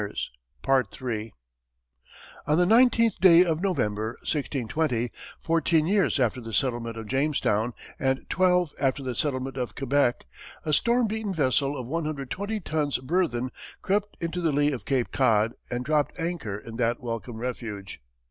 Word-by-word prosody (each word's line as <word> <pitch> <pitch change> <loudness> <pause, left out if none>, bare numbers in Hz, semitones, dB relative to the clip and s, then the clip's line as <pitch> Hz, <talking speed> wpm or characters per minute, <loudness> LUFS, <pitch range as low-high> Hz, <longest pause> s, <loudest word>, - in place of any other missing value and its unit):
On 150 - +3
the 180 - +4
nineteenth 230 0 +4
day 180 -1 +8
of 165 -1 0
November, 110 - 0
1620, 135 -3 -1 0.3
fourteen 165 -1 +2
years 195 -4 +2
after 125 0 +1
the 115 -1 -8
settlement 120 -2 -1
of 110 - -6
Jamestown 130 -4 +1 0.3
and 130 0 0
twelve 180 -3 +2
after 135 0 0
the 130 -1 -2
settlement 130 0 -2
of 125 -2 -3
Quebec, 135 -2 +1 0.4
a 155 - 0
storm 235 +9 +3
beaten 215 -2 -2
vessel 140 -1 +1
of 125 - -5
120 155 - -3
tons 150 -4 0
burthen 130 -3 0 0.3
crept 205 +1 0
into 170 +1 -3
the 165 -2 +2
lee 145 +1 +2
of 130 - -5
Cape 130 -3 0
Cod 115 -3 +3 0.2
and 125 +1 -3
dropped 150 +2 0
anchor 165 - -3
in 115 +2 -9
that 120 0 +1
welcome 115 -1 -5
refuge. 110 - -5
140 Hz, 140 wpm, -26 LUFS, 120-170 Hz, 0.4 s, day